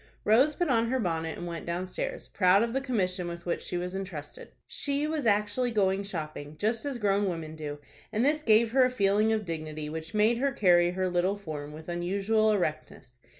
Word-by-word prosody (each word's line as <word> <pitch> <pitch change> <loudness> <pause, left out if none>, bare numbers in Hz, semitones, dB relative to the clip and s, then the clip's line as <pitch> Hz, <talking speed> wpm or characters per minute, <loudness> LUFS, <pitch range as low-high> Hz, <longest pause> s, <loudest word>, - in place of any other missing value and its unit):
Rose 260 +8 +4
put 350 - 0
on 230 -4 +2
her 260 - +1
bonnet, 165 -5 -2
and - - -6
went 170 -1 -6
downstairs, 185 - -4
proud 190 +2 +4
of 230 0 -2
the 270 - 0
commission 185 -9 -1
with 170 0 -7
which 175 - -1
she 175 - -3
was 180 +1 -4
intrusted. 185 -7 -7 0.2
She 285 0 -1
was 305 -5 -1
actually 210 +4 +2
going 195 -3 +1
shopping, 155 -6 -6
just 220 - -1
as 280 -3 -2
grown 200 -2 +1
women 160 -3 -5
do, 150 -2 -5 0.3
and 220 +4 +1
this 300 +2 +2
gave 225 -3 +4
her 260 +1 +5
a 255 - +4
feeling 210 -2 +2
of 215 -2 0
dignity 155 -2 -5
which 160 +4 -6
made 220 +3 +3
her 275 +1 +1
carry 175 -7 +4
her 185 0 0
little 180 +3 +1
form 150 -6 -6
with 155 +1 -11
unusual 200 +5 +1
erectness. 155 - -3
195 Hz, 200 wpm, -28 LUFS, 170-230 Hz, 0.3 s, her